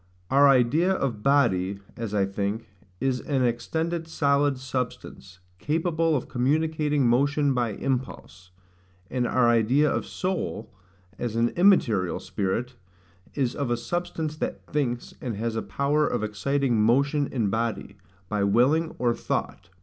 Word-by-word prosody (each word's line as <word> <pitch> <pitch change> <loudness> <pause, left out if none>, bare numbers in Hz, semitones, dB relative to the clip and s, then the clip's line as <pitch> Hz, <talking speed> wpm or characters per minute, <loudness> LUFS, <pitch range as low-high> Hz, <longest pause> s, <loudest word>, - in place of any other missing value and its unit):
Our 140 +1 +6
idea 135 +8 +3
of 130 - -1
BODY, 100 -9 +2 0.2
as 115 -3 -5
I 100 -1 +3
think, 100 +3 -3 0.3
is 130 -2 0
AN 135 -2 -1
EXTENDED 160 +8 -1
SOLID 140 -3 +1
SUBSTANCE, 125 -7 -6 0.2
CAPABLE 165 +1 0
OF 130 - -2
COMMUNICATING 150 +2 +1
MOTION 140 +3 +2
BY 120 -4 0
IMPULSE: 120 - -4 0.6
and 125 -1 0
our 125 -1 +3
idea 120 +6 +3
of - - -2
SOUL, 185 - -3 0.5
AS 120 -2 -3
AN 115 +1 +2
IMMATERIAL 120 - +3
SPIRIT, 120 +6 -3 0.6
is 130 -4 0
of 140 -4 -2
A 120 - +1
SUBSTANCE 160 +2 -3
THAT - - -4
THINKS, 125 -6 -2
AND 120 -4 -3
HAS 115 +1 -2
A 110 - -1
POWER 145 +2 0
OF - - -2
EXCITING 120 +3 0
MOTION 140 +6 +2
IN 110 -7 -1
BODY, 110 -3 -2 0.3
BY 105 0 -1
WILLING, 130 +11 +2
OR 120 -1 +1
THOUGHT. 85 - -4
130 Hz, 140 wpm, -26 LUFS, 115-145 Hz, 0.6 s, Our